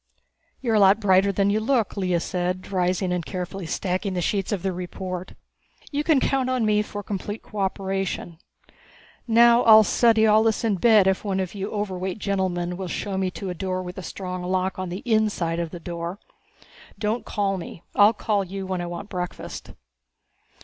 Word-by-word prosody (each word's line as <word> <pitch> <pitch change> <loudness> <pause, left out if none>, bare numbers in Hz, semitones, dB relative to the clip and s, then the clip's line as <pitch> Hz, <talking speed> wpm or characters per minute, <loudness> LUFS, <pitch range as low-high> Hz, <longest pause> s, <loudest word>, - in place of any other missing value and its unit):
"You're 235 -4 0
a 215 - +4
lot 195 +1 +6
brighter 195 -1 +4
than 200 +1 +1
you 215 - +2
look," 230 -1 0
Lea 185 -3 0
said, 180 +2 -3
rising 180 0 0
and 180 -1 -1
carefully 180 0 -5
stacking 185 +2 -2
the - - 0
sheets 195 +3 -1
of 195 -4 -2
the 190 -1 -1
report. 180 0 -6 0.6
"You 290 0 -1
can 305 -3 +4
count 260 -1 0
on 255 -3 +1
me 210 0 +3
for 205 -1 -6
complete 205 +2 -5
cooperation. 195 -4 -3 0.9
Now 235 +1 +6
I'll 220 -2 +8
study 225 0 +4
all 215 0 +5
this 225 +1 +1
in 215 -4 +1
bed 215 -1 +5
if 190 0 +1
one 195 -2 -1
of 185 -2 -3
you 200 0 -4
overweight 190 -3 -3
gentlemen 185 -4 -1
will 190 -1 -4
show 195 +2 -3
me 190 -1 0
to 185 +1 -5
a - - -3
room 185 -1 -2
with 180 +2 -7
a - - -5
strong 185 -1 -5
lock 185 +1 -1
on 185 -1 -3
the 180 +3 -6
inside 210 -7 +1
of 170 -1 -2
the 175 - -8
door. 170 +2 -5 0.8
Don't 215 +3 -1
call 195 -2 -1
me; 165 - -9
I'll 205 +2 +6
call 210 -2 0
you 195 +1 -6
when 185 -1 -2
I 175 - -4
want 175 +4 -6
breakfast." 180 -3 -6
195 Hz, 190 wpm, -24 LUFS, 180-210 Hz, 0.9 s, I'll